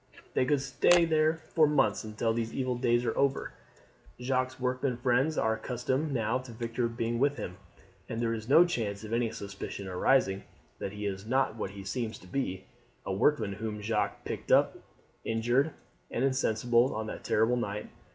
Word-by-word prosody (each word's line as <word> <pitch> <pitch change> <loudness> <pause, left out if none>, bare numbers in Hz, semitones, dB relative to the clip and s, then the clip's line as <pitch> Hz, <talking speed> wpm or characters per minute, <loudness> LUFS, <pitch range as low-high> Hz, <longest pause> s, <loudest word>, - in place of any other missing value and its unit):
They - - +2
could 145 0 +2
stay 170 +6 +4
there 155 0 +3 0.2
for 155 -3 +5
months 135 -9 +2
until 110 +1 -1
these 115 0 -2
evil 130 -2 0
days 120 0 +2
are 115 - 0
over. 140 -1 0 0.7
Jacques' 130 +1 -1
workmen 130 0 -1
friends 130 +5 +2
are 110 - +2
accustomed 130 +6 -2
now 115 -1 0
to 130 -1 -10
Victor 115 +1 -2
being 115 0 -2
with 140 +2 +2
him, 90 0 -6 0.5
and 115 - -3
there 115 -1 0
is 110 +1 -6
no 165 +5 +8
chance 110 - -2
of 110 +1 -6
any 115 -1 +1
suspicion 100 -2 -6
arising 95 +1 +2 0.4
that 95 - -4
he 105 0 -5
is 100 +1 -4
not 130 -2 +1
what 110 - -3
he 100 0 -9
seems 115 +2 -3
to 90 - -16
be, 95 -3 -2 0.4
a 95 - -2
workman 110 -1 +2
whom 105 +1 -4
Jacques 105 +1 -1
picked - - -4
up - - +5 0.5
injured 120 +6 +2 0.4
and 125 - 0
insensible 120 -1 +2
on 110 0 -2
that 110 - -7
terrible 110 +3 +2
night. 105 -3 -3
120 Hz, 180 wpm, -30 LUFS, 110-130 Hz, 0.7 s, no